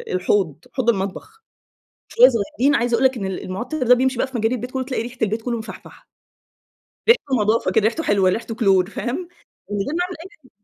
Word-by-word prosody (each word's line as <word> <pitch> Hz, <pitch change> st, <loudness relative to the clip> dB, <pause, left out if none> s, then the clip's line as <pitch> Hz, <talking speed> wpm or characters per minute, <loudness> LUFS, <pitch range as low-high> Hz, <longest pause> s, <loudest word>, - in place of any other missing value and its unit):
الحوض، 180 Hz, -5 st, +1 dB, 0.2 s
حوض 255 Hz, -3 st, 0 dB
المطبخ، 235 Hz, -, -3 dB, 0.6 s
شوية 250 Hz, +2 st, +6 dB
صغيّرين، 245 Hz, +5 st, 0 dB
عايزة 240 Hz, 0 st, +1 dB
أقول 265 Hz, -, 0 dB
لك 260 Hz, -2 st, +3 dB
إن 195 Hz, -, -4 dB
ال 190 Hz, -1 st, -4 dB
المعطِّر 250 Hz, +10 st, -4 dB
ده 250 Hz, +1 st, +6 dB
بيمشي 260 Hz, 0 st, 0 dB
بقى 260 Hz, -, 0 dB
في 260 Hz, -2 st, -5 dB
مجاري 225 Hz, +3 st, +1 dB
البيت 250 Hz, +2 st, -6 dB
كلّه 260 Hz, -1 st, -2 dB
تلاقي 255 Hz, -3 st, -3 dB
ريحة 245 Hz, +1 st, -9 dB
البيت 220 Hz, +1 st, 0 dB
كلّه 235 Hz, 0 st, -2 dB
مفحفحة. 220 Hz, -, -11 dB, 1.0 s
ريحته 285 Hz, -, +4 dB
نضافة 215 Hz, +2 st, +1 dB
كده 220 Hz, -3 st, +2 dB
ريحته 280 Hz, +9 st, 0 dB
حلوة 195 Hz, -2 st, +3 dB
ريحته 225 Hz, +3 st, -3 dB
كلور 195 Hz, -5 st, +3 dB
فاهم؟ 280 Hz, -, -4 dB, 0.4 s
وده 205 Hz, +6 st, -3 dB
نوع 355 Hz, +2 st, 0 dB
من 335 Hz, -, -12 dB
240 Hz, 190 wpm, -21 LUFS, 210-265 Hz, 1.0 s, شوية